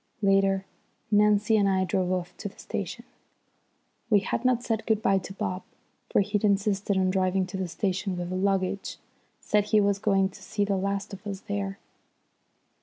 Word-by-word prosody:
Later 195 -1 +3 0.5
Nancy 210 +1 +4
and 200 -1 +3
I 190 -1 +2
drove 185 0 0
off 180 -1 -2
to 205 - -5
the - - -22
station. - - -5 1.0
We 205 -3 +5
had 225 - -2
not 250 -2 +2
said 225 -2 -2
good 220 -2 +1
bye 195 0 +4
to 190 - -9
Bob, 185 -1 -3 0.5
for - - +3
he'd 205 +1 -1
insisted 200 -1 +1
on 185 -1 +2
driving 185 0 +1
to 185 +1 -6
the 190 -1 -2
station 190 +1 -2
with 175 0 -4
the - - -2
luggage; 195 0 0 0.4
said 210 -1 +2
he 215 0 +3
was 200 -1 +2
going 195 -2 +2
to - - -15
see 205 -1 -1
the 200 -1 0
last 200 +1 -2
of 200 +2 -8
us 195 -1 -5
there. 200 -2 -3
195 Hz, 180 wpm, -27 LUFS, 190-205 Hz, 1.0 s, We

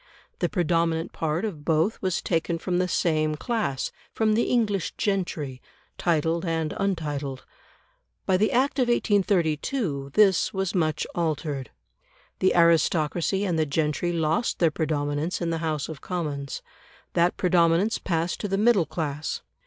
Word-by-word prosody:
The - - +1
predominant 165 -2 0
part 160 +5 -1
of 165 -9 -5
both 160 +7 +1
was 185 -2 -1
taken 165 -1 0
from 175 +1 -1
the 180 - +1
same 155 -3 +1
class 205 - -2 0.2
from 220 -1 +1
the 230 +2 +2
English 205 -7 0
gentry, 170 - -2 0.4
titled 165 0 +1
and 165 -3 -1
untitled. 150 -8 -2 0.8
By 190 -1 +3
the 215 +3 +2
Act 270 +3 +1
of 250 - +3
1832 185 - +1
this 195 -4 +4
was 190 -1 -1
much 155 -5 0
altered. 150 -5 -2 0.7
The 185 - +3
aristocracy 170 +3 +3
and 170 -4 0
the 155 - +1
gentry 150 +4 0
lost 165 +5 0
their 165 -3 +3
predominance 150 +1 -1
in 170 -1 -1
the 165 - -1
House 155 -3 -2
of 160 -3 -8
Commons; 150 -6 -4 0.5
that 170 +1 +2
predominance 180 +3 +3
passed 170 -1 -1
to 205 - -2
the 195 0 0
middle 210 -5 +4
class. 150 -2 -3
170 Hz, 145 wpm, -26 LUFS, 155-190 Hz, 0.8 s, this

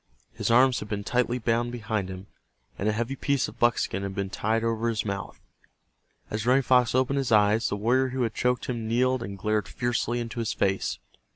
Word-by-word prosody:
His - - -2
arms 125 +2 +5
had 105 - -8
been 100 -1 -3
tightly 125 +2 0
bound 120 0 0
behind 110 -5 -3
him, 95 +1 -7 0.5
and 105 - +1
a - - +3
heavy 120 +5 -2
piece 140 0 0
of - - -12
buckskin 120 -5 +1
had 100 -1 -4
been 100 -1 -3
tied 110 +2 0
over 115 0 0
his 110 -1 -2
mouth. 100 -1 -5 0.9
As 105 0 -2
Running 130 +2 +4
Fox 125 -1 +3
opened 130 +2 +2
his 130 -3 -2
eyes, 105 +1 +4
the - - -1
warrior 125 +6 +2
who 130 0 -1
had 115 -2 -1
choked 125 -1 0
him 115 -3 -3
kneeled 125 +2 +1
and 100 -4 -6
glared 105 0 0
fiercely 120 0 -1
into 120 0 -5
his 115 -2 -1
face. 95 0 0
115 Hz, 205 wpm, -26 LUFS, 105-125 Hz, 0.9 s, arms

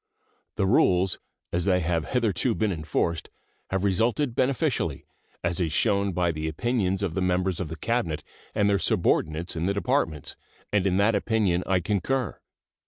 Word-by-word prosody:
The - - +1
rules, 95 -1 +3 0.3
as 85 0 0
they 90 -2 +3
have 85 -1 -1
hitherto 115 -1 +1
been 110 -2 +1
enforced, 80 0 -1 0.4
have 95 0 -1
resulted 115 +7 +1
beneficially, 130 0 0 0.4
as 85 0 0
is 85 -4 0
shown 100 +3 +2
by 90 -1 +1
the 80 0 -3
opinions 95 +3 0
of 90 -5 -1
the 95 - -1
members 90 0 +1
of 90 - -2
the 80 - -6
Cabinet 80 -5 -1 0.3
and 105 -2 +3
their 100 -1 +3
subordinates 80 0 +1
in 85 +2 -1
the 100 - 0
Departments, 100 - 0 0.4
and 100 -2 +3
in 95 -1 +2
that 105 +3 +4
opinion 100 -4 +1
I 95 -2 +2
concur. 105 +7 -1
95 Hz, 165 wpm, -26 LUFS, 85-105 Hz, 0.4 s, that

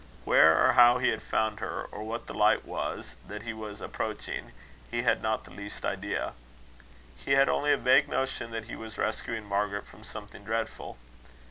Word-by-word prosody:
Where 80 +1 +7
or 130 - +4
how 120 0 +7
he 125 0 +2
had 110 - -1
found 110 -1 0
her, - - -3
or 105 - -7
what 115 +2 -4
the - - -7
light - - +3
was - - -4
that 105 0 -7
he 115 -1 -4
was 110 -1 -8
approaching, - - -4 0.4
he 120 0 -1
had 115 -2 +2
not 110 0 0
the - - -15
least 100 0 -7
idea. 100 +1 -2 0.8
He 135 - -1
had 135 0 +6
only 145 0 +2
a - - +4
vague 130 - +4
notion 130 -3 -2
that 115 -1 -5
he 115 - -7
was 110 0 -9
rescuing 110 0 -2
Margaret 100 0 -1
from - - -16
something - - -9
dreadful. 115 - -3
110 Hz, 190 wpm, -29 LUFS, 105-120 Hz, 0.8 s, Where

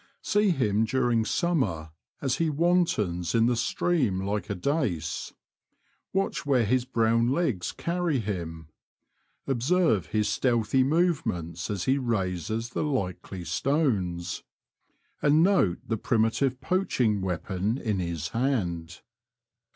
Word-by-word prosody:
See 205 0 +2
him 110 - +2
during 120 -1 +1
summer 110 - 0 0.3
as 135 -3 +1
he 165 -1 +1
wantons 145 - +1
in 115 0 +4
the 120 0 +2
stream 115 - +1
like 105 +2 -2
a 100 - -1
dace. 90 - -2 0.8
Watch 190 -3 -1
where 130 -5 +2
his 125 +3 +1
brown 115 -1 +2
legs 135 - 0
carry 170 -3 -1
him; 85 -8 -4 0.8
observe 135 - +2
his 105 -1 0
stealthy 120 0 +2
movements 120 - 0
as 100 -4 -2
he 135 +2 +2
raises 110 - -2
the - - -2
likely 95 - -3
stones; 90 - 0 0.8
and 150 +2 +4
note 180 - +3
the 115 - -1
primi 110 +1 +2
tive 130 +1 -1
poaching 125 - +1
weapon 95 +4 -2
in 110 -7 -1
his 85 -3 -3
hand. 90 -10 -2
115 Hz, 120 wpm, -27 LUFS, 95-140 Hz, 0.8 s, in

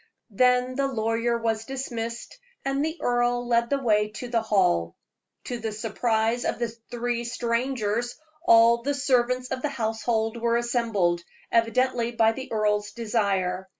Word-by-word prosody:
Then 250 +3 +3
the 275 0 +2
lawyer 230 -1 0
was 225 -1 -1
dismissed, 235 - -5 0.3
and 275 +1 0
the 320 +2 -2
earl 245 0 +1
led 235 0 +2
the 280 - +2
way 210 -5 +2
to 245 +3 -6
the 235 -2 +1
hall. 180 - +1 0.5
To 245 -1 -5
the 220 -1 -3
surprise 225 +2 0
of - - -1
the 235 -1 -1 0.2
three 240 0 -2
strangers, 235 -1 -1 0.3
all 235 -5 +6
the 285 +4 -1
servants 250 -2 +1
of 260 -1 -3
the 295 - -1
household 225 -2 -1
were 235 0 +1
assembled, 225 -8 0 0.3
evidently 235 +1 +2
by 225 -1 +4
the 260 +3 -8
earl's 210 -1 +1
desire. 195 -5 -1
235 Hz, 150 wpm, -26 LUFS, 220-245 Hz, 0.5 s, all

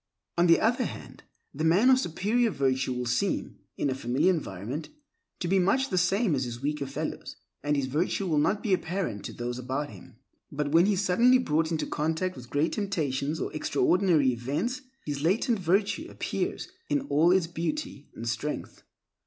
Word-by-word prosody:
On 175 +1 +4
the 165 - +6
other 235 +3 +2
hand, - - -8 0.3
the 150 +2 -3
man 190 +11 +5
of 260 - +5
superior 225 +5 +1
virtue 130 -6 0
will 125 0 -2
seem, 125 +12 -1 0.2
in - - 0
a 135 - +1
familiar 130 +8 +2
environment, 125 - -5 0.5
to 175 - -1
be 190 +2 +3
much 260 +9 +2
the - - +1
same 190 +2 +2
as 130 -2 0
his 120 -1 -6
weaker 145 +1 -2
fellows, - - -5 0.3
and 145 0 0
his 140 -2 0
virtue 160 +8 -1
will 155 -5 +2
not 200 +7 +1
be 205 - +1
apparent 175 - -2
to - - -5
those 120 +1 -4
about 135 +4 -3
him. - - -14 0.4
But 145 0 -2
when 170 +4 +5
he 210 - +3
is 190 - 0
suddenly 240 +8 +5
brought 160 -9 0
in 160 - +1
contact 160 +4 -1
with 125 -1 -11
great 145 +3 +1
temptations 155 -7 -1
or - - -3
extraordinary 165 -2 +2
events, 145 - -2 0.2
his 145 -2 -3
latent 200 - +2
virtue 200 - +1
appears - - -3 0.2
in 290 - +2
all 165 - +3
its 185 -2 +4
beauty 170 - -4
and 115 - -6
strength. 120 +6 -4
160 Hz, 185 wpm, -28 LUFS, 140-195 Hz, 0.5 s, the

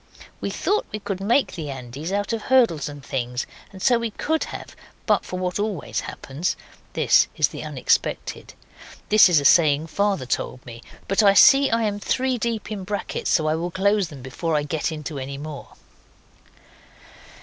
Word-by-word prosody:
(We - - -3
thought 420 +2 -1
we 215 - -3
could 195 -2 -5
make 235 +7 +2
the 155 -4 -5
Andes 135 +5 -6
out 205 +2 -1
of 225 - -2
hurdles 230 - +2
and 145 -2 -10
things, 125 -1 -3 0.3
and 190 -2 -10
so 245 -2 +4
we 235 -1 -2
could 315 +8 -1
have - - -9 0.3
but - - +2
for 185 - -6
what 180 +1 -2
always 205 -6 -2
happens. 145 +6 -4 0.4
(This - - +4
is - - +3
the - - -7
unexpected. - - -1 0.5
(This 215 -2 +7
is 165 -4 +5
a 140 - -4
saying 150 -1 +5
Father 200 -3 0
told 125 0 -3
me 115 -2 -10 0.3
but 195 +3 +2
I 200 -2 +5
see 275 +4 +7
I 230 0 +1
am 205 -1 -1
three 255 +3 0
deep 225 -2 -3
in 200 -3 -4
brackets 205 +2 -3
so 155 - +2
I 155 - +2
will 170 +2 -2
close 195 +2 +1
them 145 -5 -11
before 155 +5 -2
I 150 - +1
get 150 +2 -2
into 150 -2 -5
any 135 +1 -6
more).).). 150 0 -8
180 Hz, 185 wpm, -23 LUFS, 145-210 Hz, 0.5 s, This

